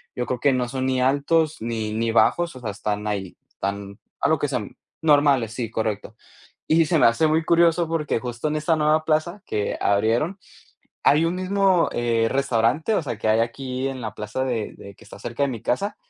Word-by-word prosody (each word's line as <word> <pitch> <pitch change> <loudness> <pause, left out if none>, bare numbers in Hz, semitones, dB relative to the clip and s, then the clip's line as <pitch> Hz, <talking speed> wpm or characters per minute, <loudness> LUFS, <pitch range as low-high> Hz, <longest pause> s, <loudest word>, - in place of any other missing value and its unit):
yo 125 - -2
creo 125 -1 -3
que 140 +2 +3
no 125 -1 -1
son 130 0 -2
ni 130 -1 +1
altos 145 +4 +2
ni 110 -2 -3
ni 115 +1 -1
bajos, 170 +7 +2
o 130 - -10
sea, 110 - -3
están 105 +1 -3
ahí, 100 -3 -3 0.2
tan 100 +1 -4 0.2
a - - +2
lo 160 -2 +2
que 145 - 0
sean 125 -7 -4 0.2
Normales, 145 -7 +3
sí, 115 -1 -3
correcto. 110 -1 -3 0.5
Y 160 0 +4
se 165 - +2
me - - +5
hace 115 +7 +4
muy 160 +1 +2
curioso 170 0 +3
porque 160 -2 -1
justo 120 +4 -4
en 150 - -1
esta 155 +2 +1
nueva 155 0 +2
plaza 165 +5 0
que 105 -1 -2
abrieron, 115 - +1 0.7
hay 155 +3 +5
un 170 +2 0
mismo, 190 -1 +2
eh, 115 -1 +1
restaurante, 135 - +1
o - - +1
sea, 120 -6 -4
que 110 - -1
hay 110 +1 +4
aquí 130 +3 -3
en 135 -1 -6
la 110 -2 -5
plaza 105 +5 -3
de 120 -5 -2
de 100 0 -12
que - - -18
está - - -12
cerca 120 +5 -2
de 140 - 0
mi 115 -4 -6
casa, 200 +11 -1
130 Hz, 210 wpm, -23 LUFS, 115-155 Hz, 0.7 s, me